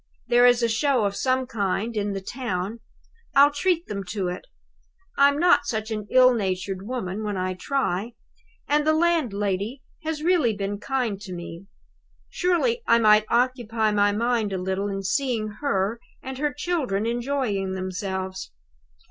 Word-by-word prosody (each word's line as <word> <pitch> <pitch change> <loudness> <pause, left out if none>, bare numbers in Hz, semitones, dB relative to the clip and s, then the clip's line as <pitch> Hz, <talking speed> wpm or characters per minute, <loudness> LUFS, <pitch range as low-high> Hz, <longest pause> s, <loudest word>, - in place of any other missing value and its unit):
There 245 0 +6
is 245 -1 +4
a - - +4
show 240 0 +1
of 200 0 -1
some 260 +2 +1
kind 220 -1 -2
in 205 -1 -1
the 195 - -4
town 205 -1 -4 0.6
I'll 285 +1 +7
treat 340 +3 0
them 200 -1 -5
to 185 0 -2
it. 180 - -7 0.7
I'm 280 +1 +4
not 310 -3 +4
such 220 0 -3
an 215 -1 -4
ill 255 0 +6
natured 190 -2 -3
woman 220 -5 -4
when 205 -2 -2
I 185 0 -1
try; 225 0 -2 0.5
and 295 +1 +2
the 310 - +5
landlady 240 - 0 0.2
has 310 -1 -3
really 320 - +3
been 200 0 -3
kind 235 -5 -2
to 195 -3 -7
me. 170 +2 -8 0.6
Surely 375 +7 +1
I 230 - +6
might 215 -1 +5
occupy 235 -3 +1
my 205 0 +3
mind 230 0 0
a 190 - -1
little 190 +2 -2
in 195 -1 -4
seeing 225 +1 0
her 220 -5 0 0.2
and 265 0 -6
her 295 0 0
children 285 - -1
enjoying 235 -5 -1
themselves. 190 - -4
225 Hz, 155 wpm, -24 LUFS, 195-265 Hz, 0.7 s, I'll